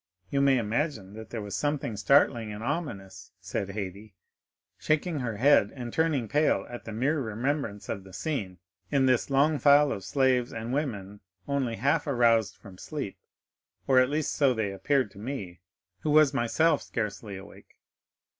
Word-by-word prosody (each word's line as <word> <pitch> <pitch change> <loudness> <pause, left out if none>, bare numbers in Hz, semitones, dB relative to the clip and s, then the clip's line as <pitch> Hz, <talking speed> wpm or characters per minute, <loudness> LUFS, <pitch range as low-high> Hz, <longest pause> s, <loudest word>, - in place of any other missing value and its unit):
You 140 - +1
may 135 -1 +4
imagine 115 - -2 0.2
there 115 -3 -5
was 100 -1 -5
something 145 -5 -1
startling 115 0 +3
and 105 +1 -7
ominous," 120 - -5
said 100 - -4
Haydée, 100 +1 -6 0.7
shaking 155 +1 0
her 115 -4 -3
head 140 +6 +4
and 120 -3 -6
turning 155 -7 +1
pale 150 +6 +2
at 120 - -8
the 115 - -6
mere 135 +8 0
remembrance 115 -2 -3
of 100 - -4
the 95 - -14
scene, 100 - -4 0.3
"in 140 -2 +2
this 130 0 +2
long 140 +2 +3
file 145 +2 +5
of 100 - -4
slaves 130 +1 +1
and 115 +2 -5
women 105 -9 -3 0.3
only 135 -5 -1
half 140 +9 +1
aroused 115 -5 +3
from 95 -4 -14
sleep, 140 -10 -5 0.7
or 130 -1 +5
at 130 0 +3
least 150 +1 -1
so 135 -4 +3
they 110 -3 -1
appeared 130 +3 0
to 100 - -14
me, 105 - -6 0.4
who 155 - -3
was 150 -2 +5
myself 150 +6 +2
scarcely 105 -2 -4
awake. 95 - -14
125 Hz, 165 wpm, -28 LUFS, 105-145 Hz, 0.7 s, file